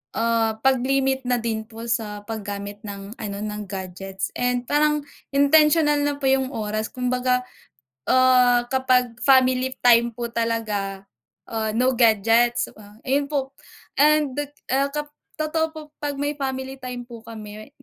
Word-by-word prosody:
ah, 230 -1 +1
'pag 265 -1 +4
limit 265 0 0
na 245 - +3
din 220 -1 -2
po 225 0 -10
sa 220 -3 -2
paggamit 205 -1 -6
ng 200 0 -7
ano, 200 -2 -4
ng 210 0 -4
gadgets 190 0 -5
and 245 0 0
parang 300 0 +2 0.3
intentional 295 +1 +5
na 290 0 0
po 285 - -15
yung 265 -1 +2
oras, 215 0 -2
kumbaga, 250 0 0 0.7
ah, 250 -1 +5
kapag 250 -2 +1
family 260 -1 +3
time 235 -1 +5
po 235 -1 -4
talaga, 210 -4 -2 0.4
ah, 220 -1 -3
no 255 +2 +3
gadgets, 230 +1 +3
ah, 210 0 -16
ayun 280 +2 +1
po, 275 -2 -2 0.5
and, 300 -2 +4
dek 290 +1 -5 0.2
ah, 275 +1 +2
kap 295 +1 -5 0.2
totoo 315 +1 0
po 315 0 -10 0.2
'pag 290 -2 -3
may 285 +1 -1
family 265 -1 -4
time 250 -1 -6
po 235 -2 -11
kami, 215 -1 -10
245 Hz, 150 wpm, -23 LUFS, 220-270 Hz, 0.7 s, intentional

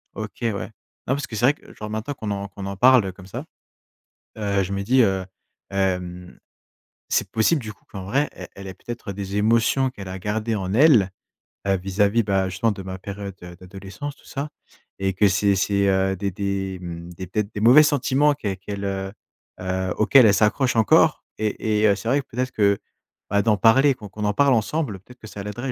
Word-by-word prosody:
OK, 105 -1 -7
ouais. 110 -4 -1 0.4
Non, 130 - +2
parce 140 - -3
que 110 - -7
c'est 120 - +2
vrai 135 - +5
que, - - -17
genre, 105 - -7
maintenant 110 +6 -3
qu'on 110 -6 -5
en 100 0 -3
qu'on 100 0 -8
en 100 0 -4
parle, 125 0 +6
heu, 95 - -3
comme 95 0 -14
ça. - - -6 0.9
Heu, 100 -2 0
je 95 +1 -4
me 100 0 -2
dis, 130 +6 +3
heu, 95 -3 +1 0.5
hem, 90 -2 -2 0.7
c'est - - 0
possible, 130 +7 +2
du 110 -1 -6
coup, - - -29
qu'en 95 -2 -7
vrai, 135 +10 +1
elle 90 - -9
elle 100 - -10
ait 95 - -7
peut-être 120 0 -7
des 100 0 -5
émotions 115 +5 +3
qu'elle 100 -6 -9
a 95 +1 -6
gardées 110 +4 -2
en 95 -3 -3
elle, 120 - +5 0.6
heu, 95 -1 +2
vis-à-vis, 100 +4 +1
bah, 95 -2 +1
justement, 95 +5 0
de 95 - -8
ma 95 0 -6
période, 100 0 -7
heu, 90 0 -9
d'adolescence, 95 +10 -8
tout - - -23
ça, 140 +2 -5 0.5
et 95 0 0
que 100 +2 +4
c'est 100 +1 +2
c'est, 100 +1 +1
heu, 95 0 +2
des 100 +2 -2
des 95 0 -3
mmh, 85 -1 -7
des 90 +2 -7
peut-être 105 +3 -2
des 105 - -4
mauvais 125 +7 +8
sentiments 145 0 +2
qu'elle 105 -9 -4
qu'elle, 100 +1 -6
heu, 95 0 -3 0.5
heu, 95 0 -2
auxquels 125 +3 +6
elle 105 - +6
s'accroche 110 +6 +2
encore 110 -2 +4
et 110 0 -1
et, - - +6
heu, 100 - +4
c'est 110 +3 -4
vrai 140 +3 +3
que - - -21
peut 115 - -13
être 130 0 0
que, 100 -3 +2 0.5
bah, 100 0 +3
d'en 110 0 +3
parler, 135 +7 +5
qu'on 110 -5 -11
qu'on 105 +2 -5
en 105 - +1
parle 140 +5 +4
ensemble, 115 -1 -1
peut 95 - -19
être 125 - -29
que 110 - -11
ça 105 - -8
l'aiderait, 120 +6 -4
100 Hz, 220 wpm, -23 LUFS, 95-115 Hz, 0.9 s, mauvais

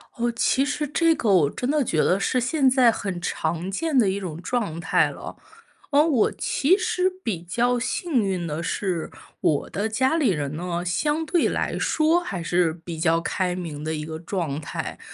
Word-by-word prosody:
哦， 240 0 0
其 265 +3 +2
实 295 +1 -2
这 325 +3 +3
个 240 -8 -1
我 165 -7 +4
真 250 - -4
的 295 0 +2
觉 160 -9 -1
得 185 - +2
是 255 - +1
现 265 +2 +2
在 255 -2 +5
很 195 -5 -4
常 170 +1 -2
见 300 +8 -1
的 220 -6 +4
一 195 +1 -1
种 170 -4 -6
状 200 -7 -2
态 - - +2
了。 - - -8 0.6
嗯， 295 +2 +5
我 265 -9 +3
其 340 +8 +2
实 365 -1 +1
比 185 -7 -2
较 240 +8 0
幸 275 +2 0
运 185 -3 -1
的 155 0 -3
是 170 0 -2 0.3
我 145 -3 +1
的 210 +3 -1
家 260 +8 +1
里 300 -6 +3
人 150 -5 -2
呢， 175 +1 -3
相 295 - 0
对 340 +2 +2
来 - - -2
说 320 +2 +2
还 195 - -5
是 175 -1 +2
比 170 -2 -5
较 165 0 +3
开 180 +1 -1
明 160 -5 -6
的 160 +1 -2
一 150 0 -4
个 160 0 -6
状 165 -4 -3
态。 150 - -5
195 Hz, 210 characters per minute, -24 LUFS, 170-270 Hz, 0.6 s, 在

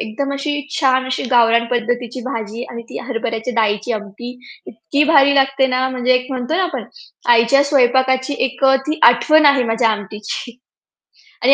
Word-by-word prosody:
एकदम 275 +6 -4
अशी 280 +2 -3 0.3
छान 260 -3 +2
अशी 260 - -3
गावरान 235 -1 +3
पद्धतीची 245 +1 -3
भाजी 230 -2 -5
आणि 235 0 -8
ती - - -7
हरभऱ्याच्या 230 0 -4
डाळीची 215 +1 0
आमटी 215 +3 -7 0.4
इतकी 280 +6 -2
भारी 280 -1 +5
लागते 270 -1 +2
ना, 255 0 0
म्हणजे 255 0 0
एक 250 0 -1
म्हणतो 255 +5 -3
ना 380 - +1
आपण 360 - -4 0.5
आईच्या 235 +5 +3
स्वयंपाकाची 260 0 +1
एक 260 +1 -5
अ, 270 0 +5
ती 310 +1 -2
आठवण 295 +6 +5
आहे 280 -3 +4
माझ्या 225 0 +1
आमटीची. 210 +3 -6 0.9
आणि 270 +3 +6
250 Hz, 160 wpm, -17 LUFS, 230-275 Hz, 0.9 s, आणि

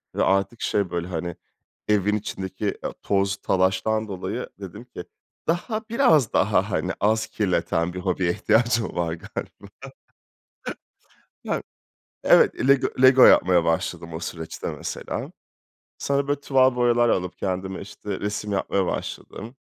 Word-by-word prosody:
ve - - +2
artık 100 +4 +1
şey 100 -3 0
böyle 85 0 -3
hani 85 -1 -4 0.5
evin 105 0 +2
içindeki 95 -1 -4
ya - - -3
toz 100 -1 +1
talaştan 95 +4 +1
dolayı 100 +5 -4
dedim 95 +4 -8
ki 105 -8 -9 0.4
daha 215 +7 -1
biraz 165 - +3
daha - - +2
hani - - -1
az 110 +1 +2
kirleten 90 -3 0
bir 90 - -5
hobiye 90 -1 0
ihtiyacım 115 +3 +1
var 85 -2 -1
galiba. 85 - -8 1.7
Yani. - - -2 0.6
Evet, 130 - +4
Lego 140 -1 +4
Lego 130 0 +8
yapmaya 90 -2 +5
başladım 85 0 -1
o 80 - -4
süreçte 80 -1 -6
mesela. - - -5 0.7
Sonra 140 0 0
böyle 145 0 0
tuval 130 -3 +3
boyalar 120 -1 +3
alıp 90 -1 -1
kendime 95 0 -3
işte 100 0 -6
resim 105 0 -3
yapmaya 95 -1 0
başladım. 115 +7 -5
100 Hz, 130 wpm, -24 LUFS, 90-120 Hz, 1.7 s, Lego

